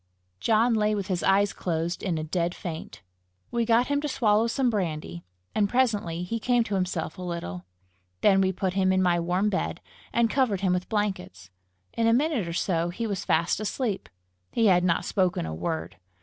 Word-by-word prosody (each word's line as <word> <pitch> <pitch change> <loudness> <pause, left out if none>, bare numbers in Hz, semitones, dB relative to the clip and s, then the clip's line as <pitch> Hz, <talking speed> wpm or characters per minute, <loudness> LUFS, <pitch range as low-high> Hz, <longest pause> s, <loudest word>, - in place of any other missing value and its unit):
John 230 - +3
lay 215 -1 +2
with 200 -2 -4
his 180 -2 0
eyes 200 +1 +3
closed, 170 0 -2
in 180 -5 -1
a 155 - -2
dead 170 +2 -1
faint. 160 - -7 0.5
We 235 -1 0
got 230 +2 +4
him 285 +1 0
to 300 - -2
swallow 225 -4 +2
some 250 +1 +1
brandy, 155 - -3 0.3
and 205 -2 +2
presently 205 -9 +1
he 230 +6 -3
came 245 +1 +2
to 210 - -5
himself 185 -2 -2
a - - -5
little. 170 - -5 0.6
Then 195 -2 +5
we 190 0 +2
put 185 0 -2
him 190 -1 +2
in 185 0 +2
my 175 -1 +3
warm 180 +5 +1
bed, 190 - -2 0.3
and 235 0 +3
covered 225 -6 +1
him 185 -2 +2
with 180 0 -2
blankets. 190 - -3 0.4
In 230 0 +1
a 230 - +5
minute 265 - +1
or 170 - -4
so 170 -1 0
he 230 +7 -4
was 200 -4 -2
fast 170 +3 +1
asleep. 215 0 -2 0.4
He 230 - +2
had 180 -3 +5
not 175 0 +1
spoken 185 - 0
a 80 - -4
word. 160 - -4
190 Hz, 195 wpm, -26 LUFS, 175-225 Hz, 0.6 s, Then